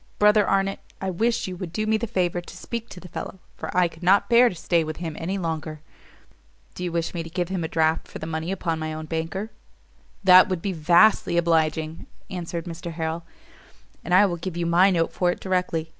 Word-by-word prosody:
Brother 210 Hz, 0 st, +5 dB
Arnott, 195 Hz, 0 st, +1 dB, 0.2 s
I 190 Hz, -1 st, -2 dB
wish 225 Hz, +6 st, 0 dB
you 185 Hz, -, -5 dB
would 175 Hz, -2 st, -6 dB
do 215 Hz, +5 st, -2 dB
me 220 Hz, 0 st, +2 dB
the 225 Hz, +2 st, -1 dB
favour 175 Hz, -3 st, 0 dB
to -, -, -12 dB
speak 235 Hz, -1 st, -6 dB
to 180 Hz, -, -10 dB
the 180 Hz, -, -11 dB
fellow, 185 Hz, -, -7 dB, 0.2 s
for -, -, -6 dB
I 180 Hz, -1 st, +5 dB
could 165 Hz, 0 st, -15 dB
not 190 Hz, +3 st, +4 dB
bear 240 Hz, +1 st, +7 dB
to 185 Hz, -, -8 dB
stay 170 Hz, 0 st, +1 dB
with 155 Hz, -1 st, -5 dB
him 165 Hz, -2 st, -5 dB
any 185 Hz, +4 st, -2 dB
longer." 160 Hz, -3 st, -4 dB, 0.9 s
"Do 180 Hz, -, -7 dB
you 175 Hz, -, -2 dB
wish 170 Hz, -1 st, -2 dB
me 170 Hz, -, -3 dB
to 165 Hz, -, -8 dB
give 175 Hz, +1 st, -2 dB
him 185 Hz, -3 st, -2 dB
a -, -, -1 dB
draft 160 Hz, 0 st, +1 dB
for -, -, -8 dB
the -, -, -6 dB
money 160 Hz, +2 st, -3 dB
upon 170 Hz, -4 st, -2 dB
my 155 Hz, 0 st, -4 dB
own 155 Hz, 0 st, -6 dB
banker?" 165 Hz, +7 st, -4 dB, 0.7 s
"That 185 Hz, +1 st, +8 dB
would 185 Hz, -2 st, -1 dB
be 195 Hz, -, -1 dB
vastly 170 Hz, +3 st, +4 dB
obliging," 160 Hz, -1 st, 0 dB, 0.2 s
answered 170 Hz, -2 st, -4 dB
Mr 170 Hz, 0 st, -6 dB
Harrel, 160 Hz, +1 st, -3 dB, 0.8 s
"and 175 Hz, -, -7 dB
I 185 Hz, +3 st, +7 dB
will 175 Hz, -3 st, -1 dB
give 170 Hz, 0 st, -5 dB
you 170 Hz, -, -1 dB
my 175 Hz, +3 st, +5 dB
note 165 Hz, -3 st, 0 dB
for 180 Hz, -, +1 dB
it 175 Hz, -, -2 dB
directly. 180 Hz, -4 st, -1 dB
175 Hz, 225 wpm, -24 LUFS, 165-190 Hz, 0.9 s, That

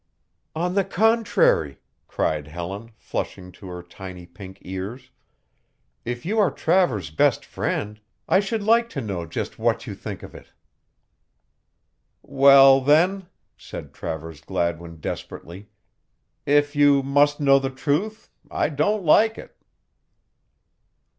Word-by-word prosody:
"On 175 Hz, +3 st, -1 dB
the 200 Hz, 0 st, +2 dB
contrary," 205 Hz, -, +2 dB, 0.3 s
cried 75 Hz, -1 st, -2 dB
Helen, 90 Hz, +7 st, -7 dB
flushing 90 Hz, -1 st, -6 dB
to 95 Hz, -, -13 dB
her 90 Hz, -1 st, -8 dB
tiny 90 Hz, 0 st, -10 dB
pink 95 Hz, +1 st, -12 dB
ears, 105 Hz, +8 st, -7 dB, 0.9 s
"if 120 Hz, +2 st, -5 dB
you 215 Hz, +5 st, 0 dB
are 205 Hz, -, +4 dB
Travers's 145 Hz, -, 0 dB
best 75 Hz, -, +1 dB
friend, 105 Hz, +1 st, -4 dB, 0.3 s
I 190 Hz, -, +4 dB
should 205 Hz, +2 st, -2 dB
like 230 Hz, +2 st, +3 dB
to 140 Hz, -, -5 dB
know 95 Hz, -7 st, -5 dB
just -, -, -5 dB
what -, -, 0 dB
you -, -, -6 dB
think -, -, -8 dB
of -, -, -11 dB
it." -, -, -13 dB, 1.8 s
"Well, 135 Hz, 0 st, +6 dB
then," 175 Hz, +7 st, +2 dB, 0.3 s
said -, -, -10 dB
Travers 80 Hz, -1 st, -7 dB
Gladwin 85 Hz, -2 st, -3 dB
desperately, 95 Hz, +6 st, -7 dB, 0.8 s
"if 145 Hz, +1 st, +2 dB
you 145 Hz, -1 st, +4 dB
must 145 Hz, +2 st, +2 dB
know 135 Hz, -1 st, +5 dB
the 135 Hz, 0 st, -2 dB
truth, 150 Hz, +11 st, -3 dB, 0.2 s
I -, -, 0 dB
don't 175 Hz, +7 st, 0 dB
like 220 Hz, +8 st, +4 dB
it." -, -, -12 dB
135 Hz, 125 wpm, -23 LUFS, -, 1.8 s, Well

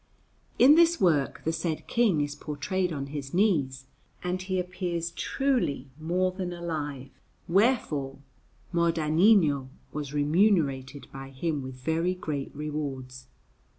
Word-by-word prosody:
In 270 Hz, +4 st, +8 dB
this 335 Hz, +1 st, +5 dB
work 155 Hz, -7 st, +2 dB
the 160 Hz, -, 0 dB
said 160 Hz, -1 st, -3 dB
King 215 Hz, -10 st, +2 dB
is 145 Hz, 0 st, -2 dB
portrayed 175 Hz, +6 st, -2 dB
on 140 Hz, -3 st, -3 dB
his 140 Hz, 0 st, -5 dB
knees, 145 Hz, -10 st, +1 dB, 0.4 s
and 180 Hz, +1 st, -2 dB
he 185 Hz, 0 st, -1 dB
appears 175 Hz, -2 st, -3 dB
truly 230 Hz, -, -1 dB
more 180 Hz, +4 st, 0 dB
than 185 Hz, -1 st, -4 dB
alive; 150 Hz, -6 st, -4 dB, 0.4 s
wherefore 170 Hz, -, +1 dB, 0.6 s
Modanino 165 Hz, -3 st, +3 dB, 0.2 s
was 150 Hz, -2 st, -4 dB
remunerated 145 Hz, -3 st, +1 dB
by 135 Hz, 0 st, -8 dB
him 145 Hz, +2 st, -2 dB
with 130 Hz, -1 st, -7 dB
very 160 Hz, +7 st, 0 dB
great 150 Hz, -6 st, -4 dB
rewards. 135 Hz, -4 st, -5 dB
160 Hz, 120 wpm, -28 LUFS, 140-180 Hz, 0.6 s, In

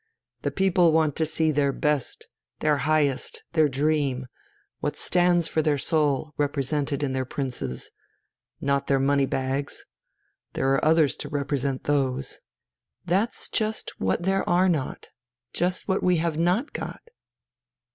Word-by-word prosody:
The -, -, 0 dB
people 185 Hz, -3 st, +3 dB
want 155 Hz, -3 st, +2 dB
to 160 Hz, -, +1 dB
see 160 Hz, 0 st, +1 dB
their 140 Hz, -1 st, +2 dB
best, 150 Hz, -1 st, -1 dB, 0.3 s
their 150 Hz, -1 st, +2 dB
highest, 145 Hz, -4 st, 0 dB
their 155 Hz, -3 st, +4 dB
dream, 140 Hz, -2 st, 0 dB, 0.5 s
what -, -, -2 dB
stands 175 Hz, -2 st, +3 dB
for 160 Hz, -, 0 dB
their 150 Hz, -2 st, +1 dB
soul, 150 Hz, 0 st, 0 dB
represented 145 Hz, 0 st, -1 dB
in 135 Hz, -2 st, -1 dB
their 130 Hz, 0 st, 0 dB
princes 125 Hz, -, -5 dB, 0.7 s
not 140 Hz, 0 st, 0 dB
their 135 Hz, -, +3 dB
money 140 Hz, 0 st, +2 dB
bags. 135 Hz, +2 st, -3 dB, 0.7 s
There 135 Hz, 0 st, +1 dB
are 135 Hz, -, +1 dB
others 155 Hz, -3 st, +4 dB
to -, -, -6 dB
represent 140 Hz, -2 st, -2 dB
those...." 135 Hz, -2 st, -1 dB, 0.7 s
"That's 195 Hz, +6 st, 0 dB
just 220 Hz, 0 st, -2 dB
what 95 Hz, -, 0 dB
there 195 Hz, +1 st, +1 dB
are 180 Hz, +2 st, +4 dB
not; 155 Hz, -7 st, -2 dB, 0.4 s
just 180 Hz, +1 st, -1 dB
what 190 Hz, -1 st, +1 dB
we 180 Hz, -1 st, +3 dB
have 165 Hz, -1 st, 0 dB
not 180 Hz, -, +1 dB
got." -, -, -6 dB
150 Hz, 140 wpm, -25 LUFS, 135-170 Hz, 0.7 s, their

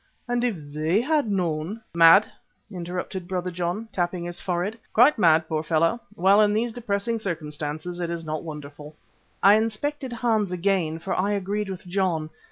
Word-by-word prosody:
And 245 Hz, 0 st, 0 dB
if 240 Hz, -4 st, +1 dB, 0.2 s
they 155 Hz, +6 st, +1 dB
had 290 Hz, -1 st, +1 dB
known 180 Hz, +1 st, -1 dB
" -, -, -42 dB
"Mad!" 165 Hz, +6 st, +8 dB, 0.5 s
interrupted 180 Hz, 0 st, -5 dB
Brother 180 Hz, -1 st, -2 dB
John, 180 Hz, +5 st, -3 dB
tapping 175 Hz, -1 st, -2 dB
his 175 Hz, 0 st, -5 dB
forehead, 185 Hz, +5 st, -2 dB
"quite 245 Hz, +3 st, +5 dB
mad, 160 Hz, -3 st, +4 dB
poor 155 Hz, -1 st, -1 dB
fellow! 165 Hz, +7 st, +1 dB, 0.2 s
Well, 200 Hz, +2 st, +5 dB
in 210 Hz, 0 st, +3 dB
these 230 Hz, +1 st, 0 dB
depressing 225 Hz, 0 st, -2 dB
circumstances 155 Hz, -2 st, -3 dB
it 170 Hz, -1 st, -2 dB
is 170 Hz, -1 st, -4 dB
not 155 Hz, 0 st, -3 dB
wonderful." 150 Hz, -1 st, -9 dB, 0.5 s
I 200 Hz, -, +8 dB
inspected 255 Hz, +5 st, -2 dB
Hans 225 Hz, -5 st, 0 dB
again, 180 Hz, -3 st, 0 dB
for 170 Hz, +4 st, -4 dB
I 200 Hz, +3 st, +1 dB
agreed 200 Hz, +1 st, -2 dB
with 190 Hz, -1 st, -7 dB
John. 175 Hz, -4 st, -1 dB
185 Hz, 170 wpm, -25 LUFS, 165-210 Hz, 0.5 s, Mad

